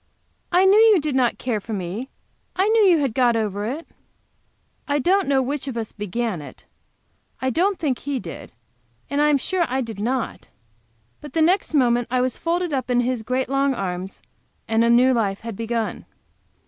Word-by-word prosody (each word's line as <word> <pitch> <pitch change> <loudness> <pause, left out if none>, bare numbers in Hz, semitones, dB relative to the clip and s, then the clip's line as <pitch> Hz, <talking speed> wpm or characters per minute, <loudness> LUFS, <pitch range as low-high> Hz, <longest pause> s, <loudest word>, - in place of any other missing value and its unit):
"I 365 +1 +4
knew 395 +3 +6
you 440 -4 +6
did 300 -2 -2
not 255 -2 +1
care 240 -4 -2
for 220 +2 -7
me 200 +7 -4 0.5
I! 380 +2 +2
knew 450 0 +4
you 355 -3 +5
had 275 -6 0
got 245 -1 +3
over 205 -2 -2
it!" 280 +9 -4 1.0
I 290 0 +1
don't 375 +7 +2
know 270 -1 +2
which 280 +2 -3
of 255 -3 -4
us 225 -2 -4
began 210 -2 -3
it, 145 - -12 0.7
I 260 0 -1
don't 370 +7 +1
think 275 -6 -1
he 280 -2 -3
did, 170 - -9 0.6
and 285 +1 +1
I 300 - +4
am 295 - +4
sure 360 +6 0
I 260 +2 -1
did 225 -5 -6
not, 245 +3 -2 0.7
but 295 -2 -11
the 325 - +1
next 350 -1 +2
moment 245 -3 +3
I 255 +1 +1
was 255 0 0
folded 345 -1 -1
all 270 - +2
up 255 - -10
in 245 0 +3
his 245 -1 -1
great 255 +3 -1
long 275 0 +1
arms, 185 -2 -5 0.4
and 225 0 +2
a 235 - +3
new 250 +2 +5
life 200 -5 -1
had 230 -2 -6
begun! 230 +1 -3
255 Hz, 200 wpm, -22 LUFS, 230-295 Hz, 1.0 s, knew